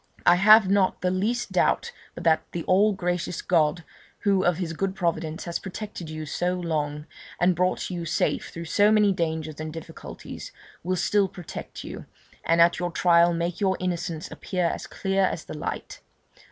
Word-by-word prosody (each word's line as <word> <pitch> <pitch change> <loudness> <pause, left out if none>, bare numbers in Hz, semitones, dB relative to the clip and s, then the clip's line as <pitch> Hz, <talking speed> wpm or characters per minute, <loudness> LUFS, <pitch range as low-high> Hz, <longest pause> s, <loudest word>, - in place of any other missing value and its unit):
I 175 - +7
have 215 +2 +7
not 195 -1 +2
the 180 0 +1
least 225 +6 -1
doubt 475 - +1 0.2
but 170 - -7
that 160 -2 +4
the 170 - -3
all 205 +3 +4
gracious 180 -2 -2
God, 165 -1 +2 0.4
who 195 -3 +2
of 175 -3 +2
his 175 -3 -3
good 195 +3 -2
providence 165 -3 -2
has 170 -1 -3
protected 190 -3 -7
you 155 0 -5
so 180 +4 -1
long, 150 -4 -2 0.3
and 175 +1 +3
brought 180 +2 0
you 175 -2 -4
safe 165 - -1
through 170 0 -7
so 205 +5 +3
many 210 -2 +4
dangers 160 -3 -3
and 155 0 -4
difficulties, 165 0 -9 0.3
will 185 +2 0
still 195 +3 +2
protect 180 -2 -8
you, - - -8 0.4
and 165 0 +2
at 170 +1 +5
your 175 0 -1
trial 170 0 +4
make 170 0 -2
your 190 -1 +2
innocence 175 -1 -3
appear 180 -2 -2
as 170 - -2
clear 195 0 0
as 175 - -3
the - - -7
light. 150 - -5
175 Hz, 180 wpm, -25 LUFS, 165-190 Hz, 0.4 s, I